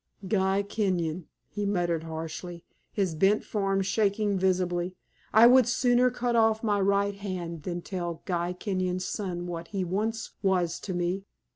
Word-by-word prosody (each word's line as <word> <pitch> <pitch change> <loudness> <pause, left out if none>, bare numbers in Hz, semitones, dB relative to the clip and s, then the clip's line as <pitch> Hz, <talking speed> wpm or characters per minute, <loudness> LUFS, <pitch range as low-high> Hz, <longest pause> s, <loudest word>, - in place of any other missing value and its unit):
"Guy 195 -1 +2
Kenyon," 180 -6 -1 0.2
he 205 - -3
muttered, 175 -5 0
harshly, 165 +2 -6 0.3
his 190 -5 0
bent 195 +6 +3
form 195 -2 0
shaking 205 +1 +1
visibly; 180 -1 0 0.4
"I 220 +2 +7
would 250 0 +7
sooner 245 0 +3
cut 245 -1 -1
off 220 -1 +3
my 205 -2 +2
right 200 +1 +2
hand 180 -5 -5
than 175 +1 -4
tell 175 -3 -4
Guy 175 -1 -1
Kenyon's 185 -1 -2
son 180 -4 -3
what 170 -1 -5
he 195 0 -2
once 215 +5 -2
was 180 -4 +1
to 185 - -5
me. 180 +3 -1
190 Hz, 150 wpm, -28 LUFS, 175-205 Hz, 0.4 s, I